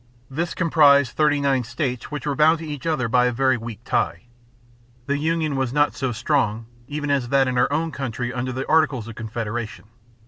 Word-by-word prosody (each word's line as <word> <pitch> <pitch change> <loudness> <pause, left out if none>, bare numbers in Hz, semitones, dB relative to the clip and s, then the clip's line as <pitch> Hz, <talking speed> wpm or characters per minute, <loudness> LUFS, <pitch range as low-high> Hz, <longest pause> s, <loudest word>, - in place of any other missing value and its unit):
This 165 +6 -3
comprised 145 -6 +4
thirty 150 -1 +2
nine 135 -3 +1
states 125 +1 -3
which 150 0 -5
were 145 - 0
bound 155 +3 +4
to 160 - -8
each 150 0 -6
other 155 -7 0
by 125 +1 +3
a - - +1
very 130 +2 +2
weak 115 -2 -7
tie. 85 0 -1 0.8
The 140 +1 -1
union 160 -1 0
was 130 -2 -1
not 145 0 +2
so 135 -2 -2
strong 120 -3 0 0.2
even 145 0 -3
as 135 -4 0
that 135 0 +3
in 130 - -1
our 125 +2 +2
own 160 +2 0
country 125 -3 -4
under 125 0 -3
the 130 +2 -4
Articles 150 -8 +2
of 115 - -7
Confederation. 115 0 -5
135 Hz, 200 wpm, -22 LUFS, 120-150 Hz, 0.8 s, comprised